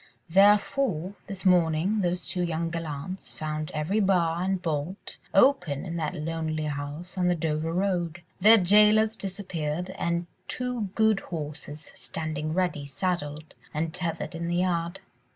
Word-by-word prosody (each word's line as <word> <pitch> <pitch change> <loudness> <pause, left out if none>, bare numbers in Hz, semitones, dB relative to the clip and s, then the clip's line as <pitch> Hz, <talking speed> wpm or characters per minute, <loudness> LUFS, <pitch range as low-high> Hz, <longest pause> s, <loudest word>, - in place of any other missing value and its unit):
Therefore, 200 - +3
this 195 -1 -7
morning, 180 +3 +3
those 180 0 -1
two 180 - -2
young 165 -1 -1
gallants 165 +2 -5
found 155 -1 -4
every 160 +8 0
bar 175 -4 +2
and 190 0 0
bolt 165 +2 -4
open 190 - +3
in 170 -2 -4
that 160 +1 -2
lonely 160 -1 -2
house 150 +5 -5
on 180 - +2
the 180 - +3
Dover 160 0 -1
Road, 175 -2 -1 0.2
their 215 +4 +8
jailers 210 +3 +5
disappeared, 180 -4 -4
and 170 -1 -1 0.2
two 250 -5 -2
good 220 -2 +4
horses 150 -3 -7
standing 155 -1 -4
ready 170 -5 0
saddled 150 0 -3 0.2
and 160 +1 -1
tethered 170 -1 -3
in 170 0 -4
the 175 - 0
yard. 175 -1 0
170 Hz, 140 wpm, -27 LUFS, 155-190 Hz, 0.2 s, their